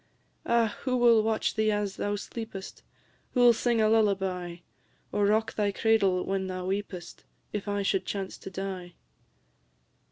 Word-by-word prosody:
"Ah! 230 -2 +2
who 255 -1 0
will 235 -2 +6
watch 220 0 0
thee 215 0 +2
as 205 -2 -2
thou 205 0 -1
sleep'st? 205 -2 -7 0.5
Who 245 - +4
'll 240 -1 +8
sing 235 0 +1
a 215 - +4
lullaby, 195 -5 +1 0.6
Or 205 -1 +2
rock 220 +2 +2
thy 205 -1 +1
cradle 195 -4 +2
when 195 -1 -1
thou 185 -1 -4
weep'st, 190 -2 -4 0.3
If 210 0 -3
I 205 0 -1
should 195 -1 0
chance 195 -2 -4
to - - -8
die?" 190 -2 -6
205 Hz, 155 wpm, -28 LUFS, 190-220 Hz, 0.6 s, ll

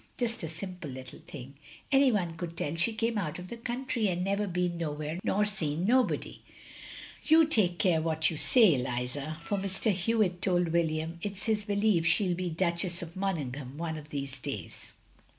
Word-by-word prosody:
Just 235 -1 0
a 160 - -3
simple 180 -1 -6
little 130 -1 -9
thing! 135 -2 -9 0.4
Any 270 -1 +6
one 175 -6 0
could 170 0 -6
tell 145 - -2
she 175 +8 +2
came 225 0 0
out 155 -6 -3
of 180 0 -8
the - - -5
country 240 -1 -1
and 180 -1 0
never 200 +2 0
been 180 -1 -1
no 160 -3 -1
where 155 +3 -4
nor 210 +1 +2
seen 175 -5 -1
nobody. 250 +3 +1 0.3
" - - -13
" - - -15
You 320 +1 +7
take 205 - +2
care 175 -5 +3
what 160 0 +1
you - - -4
say, 215 - +5
Eliza; 130 +4 -3
for 200 +3 -2
Mr. 195 +3 0
Hewitt 190 -1 +1
told 175 -3 +2
William 165 0 0
it 200 0 -4
's - - -6
his 215 -2 0
belief 205 -4 +2
she 170 +5 +3
'11 180 -2 +1
be 180 0 -2
Duch 170 +1 0
ess 175 -1 -2
of 165 0 -9
Monaghan 145 -8 -3
one 165 -1 -3
of 150 -1 -9
these 140 -2 -5
days. - - -6
175 Hz, 205 wpm, -30 LUFS, 160-205 Hz, 0.4 s, You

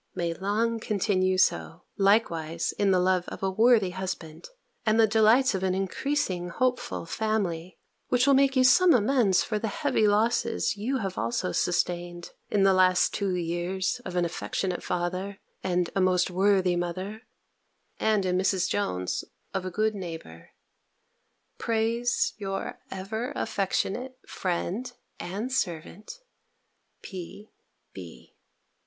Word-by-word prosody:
may 170 -1 -1
long 215 +6 -1
continue 185 -3 +1
so, 80 - +1
likewise 170 -6 +1
in 200 - +3
the 190 - +4
love 180 -1 +1
of - - -8
a 190 - +1
worthy 220 -2 +4
husband, 185 - -6 0.3
and 220 0 +2
the 225 - +7
delights 220 +5 +4
of 190 - -2
an 185 -1 0
increasing 195 -2 -1
hopeful 250 0 -1
family, 185 -4 -2 0.3
which 250 0 +2
will 280 - +5
make 275 0 +4
you 260 - +4
some 335 +6 +6
amends 225 -4 +3
for 215 -2 -2
the 220 - -2
heavy 235 -1 +1
losses 230 +2 +1
you 235 +7 -1 0.2
also 115 -5 -1
have - - -4
sustained, 175 0 -1 0.2
in 200 -2 +2
the 195 - +6
two - - +3
last 185 +2 +3
years 180 +2 -1
of 180 - -6
an 175 -1 +2
affectionate 180 +2 -3
father, 185 +3 -3 0.3
and 180 -2 0
a 195 - +2
most 185 -1 +2
worthy 190 -1 +3
mother, 185 +5 -4 0.8
and, 215 -3 +2
in 180 -1 +1
Mrs. 190 0 +1
Jones, 90 - -2 0.3
of 190 -1 -2
a - - -2
good 215 +4 0
neighbour, 165 - -8 1.1
prays 230 +1 0
your 195 -1 -4
ever 220 +8 -4
affectionate 225 +4 -2
friend 190 +7 -3 0.3
and 205 +8 -4
servant, 175 - -3 0.9
P.B. 190 +3 -12
195 Hz, 135 wpm, -27 LUFS, 180-220 Hz, 1.1 s, the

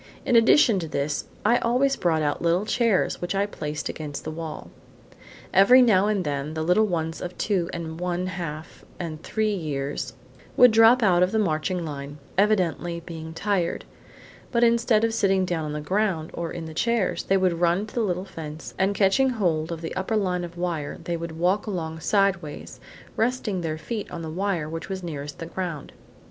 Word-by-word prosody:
In 245 - +2
addition 230 -2 +6
to 165 - -4
this, 145 0 -2 0.2
I 235 +3 +5
always 255 +4 +2
brought 160 -3 +1
out 145 -1 -1
little 170 +4 +2
chairs, 230 -4 +1
which 175 +2 -2
I 200 +1 +2
placed 150 -6 -5
against 150 -2 -6
the 155 - -4
wall. 160 -1 -7 0.8
Every 245 +7 +7
now 205 -4 +4
and 205 -4 0
then, 145 +1 -3
the 160 - -1
little 180 +6 +3
ones 165 -3 -2
of 180 0 -6
two 185 -5 0
and 165 -1 -6
one 180 0 -1
half 165 -4 -6 0.2
and 160 -3 -5
three 215 +2 -1
years 145 -6 -3 0.4
would 250 -1 +8
drop 225 +2 +6
out 180 -4 +4
from 180 - +4
the 220 - -1
marching 175 -2 0
line, 145 -1 -6 0.2
evidently 180 -4 +1
being 160 -1 -7
tired; 190 -2 -1 0.7
but 235 -1 +2
instead 230 -2 +3
of 230 0 +1
sitting 195 -4 +2
down 170 -3 -2
on 150 - -4
the 150 - -3
ground 185 -1 -1
or 170 -1 -4
on 170 -2 -5
the 160 - -8
chairs, 235 +3 0
they 195 - +3
would 180 -3 +1
run 175 +4 +2
to 215 - -14
the 240 - 0
little 185 -3 -1
fence 160 -4 -8
and 195 +1 +2
catching 210 +8 +3
hold 175 -9 0
of 165 -1 -5
the 165 - -5
upper 190 +4 -1
line 180 -3 0
of 175 0 -8
wire 170 -5 -3
they 170 - -2
would 170 -1 -5
walk 185 +6 +1
along 160 -5 -4
sideways, 190 -4 0 0.4
resting 225 -5 0
their 160 -2 -2
feet 210 +7 -5
on 165 - -6
the 160 - -5
wire 180 -3 -1
which 165 +3 -6
was 190 -1 -4
nearest 145 -3 -6
the 165 - -6
ground. 170 -4 -5
180 Hz, 195 wpm, -25 LUFS, 160-205 Hz, 0.8 s, would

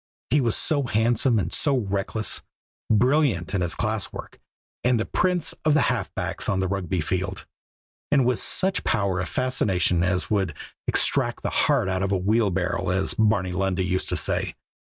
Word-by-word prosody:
He 145 +2 +4
was 115 -4 +2
so 155 -3 +2
handsome 115 +2 +2
and 90 -4 -1
so 140 -3 +2
reckless, 100 0 -2 0.5
brilliant 115 - +2
in 95 - 0
his 85 -2 0
class - - -2
work, - - -9 0.4
and 125 -1 +2
the 110 - -1
prince 180 -2 +1
of 155 -1 +3
half 155 - +1
backs - - -2
on 95 - +1
the 95 - 0
Rugby 95 -2 -2
field, 95 +4 -3 0.7
and 140 -4 +4
with 125 -2 +1
such 190 0 0
power 100 -5 0
of 90 - -3
fascination 95 -9 +1
as 90 +3 0
would 95 -7 0 0.3
"extract - - +1
the - - -1
heart - - +2
out 95 0 -1
of 100 0 -1
a 95 - +2
wheelbarrow," 95 -3 0
as 95 +1 0
Barney 105 -4 +1
Lundy 95 0 -1
used 95 0 -1
to - - 0
say. - - 0
100 Hz, 175 wpm, -24 LUFS, 95-120 Hz, 0.7 s, He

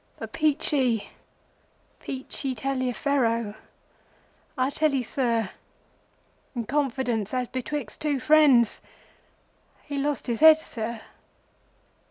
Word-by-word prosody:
But - - -8
Peachey, 280 -7 +1 0.9
Peachey 265 0 -5
Taliaferro, 250 -3 0 1.0
I 260 +2 +1
tell 300 -1 +1
you, 260 - 0
Sir, 230 -4 -1 1.0
in 235 -2 -3
confidence 255 -5 -1
as 250 -1 -1
betwixt 260 -2 -4
two 290 -3 0
friends, 275 -5 +4 1.0
he 285 -1 -5
lost 285 0 -1
his 235 -2 -2
head, 315 0 +9
Sir. 230 -6 -5
260 Hz, 95 wpm, -26 LUFS, 235-285 Hz, 1.0 s, head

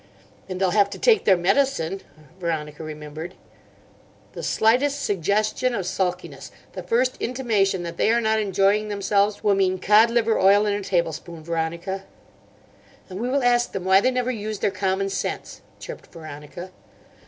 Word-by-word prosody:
"And 185 -1 -4
they'll 190 -2 +2
have 200 0 +3
to - - -7
take 450 -4 +3
their 190 -3 +5
medicine," 195 -1 +1 0.4
Veronica 160 -3 -4
remembered. 155 +2 -8 1.0
"The - - -7
slightest 275 +6 +2
suggestion 215 +6 0
of 195 - -3
sulkiness, 180 -5 -3 0.2
the 185 - -6
first 240 +8 0
intimation 215 -7 0
that 170 -1 -6
they - - +2
are 235 +1 +3
not 220 -1 +1
enjoying 200 +1 +2
themselves, 205 0 0
will 205 - +4
mean 190 -1 +1
cod 210 +5 +5
liver 230 -1 +1
oil 200 +2 +5
in 205 - +1
a 205 - -2
tablespoon, 170 -3 -2
Veronica." 170 +4 -3 1.1
"And 185 - -6
we 245 +3 -2
will 275 0 +1
ask 240 0 +2
them 185 -2 -4
why 190 +1 +5
they 255 - +3
never 250 0 -1
use 215 -2 -4
their 195 - 0
commonsense," 190 0 -2 0.2
chirped - - -9
Veronica. 160 +3 -10
195 Hz, 155 wpm, -23 LUFS, 175-220 Hz, 1.1 s, their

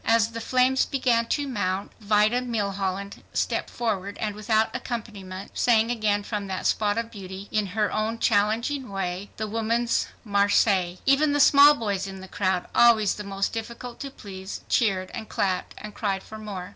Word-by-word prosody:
As 225 -1 +4
the 230 0 -6
flames 255 +2 +3
began 245 -4 +1
to 290 +2 -1
mount, 200 -5 -2
Vida 215 +3 +3
Milholland 200 -4 -3
stepped - - -1
forward 205 -4 -3
and 210 -1 -2
without 215 +1 +1
accompaniment 200 -5 -6
sang 230 -1 +3
again 210 -3 0
from 205 -1 -4
that 190 -1 -4
spot 205 -1 +1
of 230 0 -3
beauty, 195 -2 -8
in 210 -2 +1
her 210 -1 +2
own 220 +2 -1
challenging 230 +6 +1
way, 195 0 -3
the 215 - -2
Woman's 230 +2 0 0.2
Marseillaise. 200 -3 +2
Even 285 +2 +4
the 290 - +1
small 285 +1 +8
boys 200 -6 -2
in 190 0 -8
the 190 - -10
crowd, 185 -2 -1
always 220 -4 +5
the 210 - -7
most 195 0 -2
difficult 235 +2 -6
to 275 - -5
please, 190 -6 -8
cheered 195 -6 +1
and 220 - -6
clapped 185 -2 -1
and 210 0 -8
cried 195 -3 -2
for 220 - -10
more. 195 -4 -6
210 Hz, 170 wpm, -25 LUFS, 195-230 Hz, 0.2 s, small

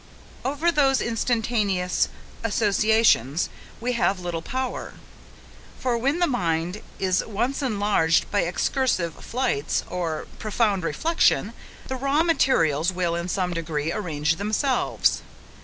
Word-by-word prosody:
Over 290 +6 +1
those 270 -4 +3
instantaneous 220 -5 0 0.3
associations 210 - +3 0.3
we 245 +2 -1
have 200 -5 +1
little 175 -2 -3
power; 260 +7 -4 0.8
for 250 -2 0
when 270 +7 +1
the 350 - +3
mind 175 - -1 0.2
is 185 -1 +1
once 240 +7 -2
enlarged 205 - +2
by 205 - +2
excursive 180 - 0
flights, 240 - -1
or 170 -3 -3
profound 210 -3 +1
reflection, 315 - +1 0.3
the 260 - -4
raw 275 +4 +2
materials, 170 - +2
will, 175 -2 -1
in 170 +1 -2
some 180 -1 -1
degree, 160 -2 -2
arrange 160 -5 -1
themselves. 220 +6 +1
205 Hz, 115 wpm, -24 LUFS, 170-255 Hz, 0.8 s, those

